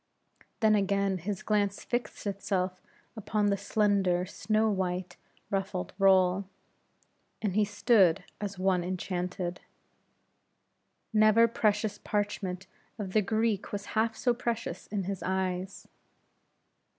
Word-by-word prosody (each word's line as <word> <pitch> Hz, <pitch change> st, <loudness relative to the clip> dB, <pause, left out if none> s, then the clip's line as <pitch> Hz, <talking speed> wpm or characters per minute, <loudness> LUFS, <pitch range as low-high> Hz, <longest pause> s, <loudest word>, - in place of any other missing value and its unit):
Then 220 Hz, -1 st, +5 dB
again 200 Hz, -2 st, +1 dB
his 200 Hz, +3 st, -4 dB
glance 205 Hz, -2 st, 0 dB
fixed 240 Hz, -2 st, -3 dB
itself 190 Hz, -2 st, -2 dB, 0.3 s
upon 215 Hz, -1 st, -1 dB
the -, -, +3 dB
slender, 195 Hz, -4 st, +1 dB
snow 215 Hz, +3 st, 0 dB
white, 185 Hz, -3 st, -2 dB, 0.4 s
ruffled 195 Hz, -2 st, -2 dB
roll; 190 Hz, 0 st, +4 dB, 0.9 s
and 205 Hz, -4 st, -1 dB
he 215 Hz, +2 st, +3 dB
stood 205 Hz, -4 st, +3 dB, 0.2 s
as 200 Hz, -2 st, -4 dB
one 185 Hz, -1 st, +2 dB
enchanted. 180 Hz, 0 st, -3 dB, 1.5 s
Never 215 Hz, +2 st, +6 dB
precious 210 Hz, -2 st, 0 dB
parchment 200 Hz, -3 st, -2 dB, 0.3 s
of 195 Hz, -4 st, -5 dB
the 215 Hz, -, +4 dB
Greek 220 Hz, 0 st, 0 dB
was 205 Hz, 0 st, -4 dB
half 225 Hz, 0 st, +1 dB
so 245 Hz, -, +2 dB
precious 230 Hz, -6 st, -3 dB
in 200 Hz, -2 st, -2 dB
his 195 Hz, 0 st, -4 dB
eyes. 185 Hz, 0 st, -2 dB
200 Hz, 115 wpm, -29 LUFS, 185-215 Hz, 1.5 s, Never